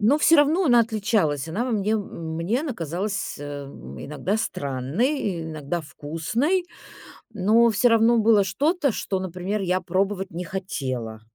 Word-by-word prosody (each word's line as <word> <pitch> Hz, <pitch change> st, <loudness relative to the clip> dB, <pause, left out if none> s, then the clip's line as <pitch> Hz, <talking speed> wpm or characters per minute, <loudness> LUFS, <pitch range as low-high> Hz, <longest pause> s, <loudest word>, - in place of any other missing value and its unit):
Но 230 Hz, +8 st, +4 dB
всё 325 Hz, +2 st, +6 dB
равно 310 Hz, +6 st, +4 dB
она 240 Hz, -2 st, +6 dB
отличалась. 205 Hz, -, 0 dB
Она 210 Hz, +10 st, -1 dB
во 255 Hz, -, -2 dB
мне 215 Hz, 0 st, +1 dB
мне 170 Hz, -, -3 dB
она 300 Hz, -4 st, -3 dB
казалась, 195 Hz, +2 st, -3 dB
э, 145 Hz, -, -8 dB, 0.2 s
м, 70 Hz, -, -10 dB
иногда 150 Hz, +8 st, -2 dB
странной, 175 Hz, -, -1 dB
иногда 155 Hz, +1 st, -4 dB
вкусной, 165 Hz, -, -1 dB, 0.7 s
но 220 Hz, +4 st, +4 dB
всё 220 Hz, +3 st, +3 dB
равно 230 Hz, +1 st, +4 dB
было 215 Hz, -2 st, +5 dB
что-то, 285 Hz, -, +1 dB
что, 195 Hz, -, -2 dB
например, 185 Hz, +3 st, -3 dB
я 185 Hz, 0 st, +1 dB
пробовать 190 Hz, +2 st, -1 dB
не 175 Hz, +1 st, -5 dB
хотела. 130 Hz, -, -4 dB
195 Hz, 150 wpm, -24 LUFS, 165-230 Hz, 0.7 s, всё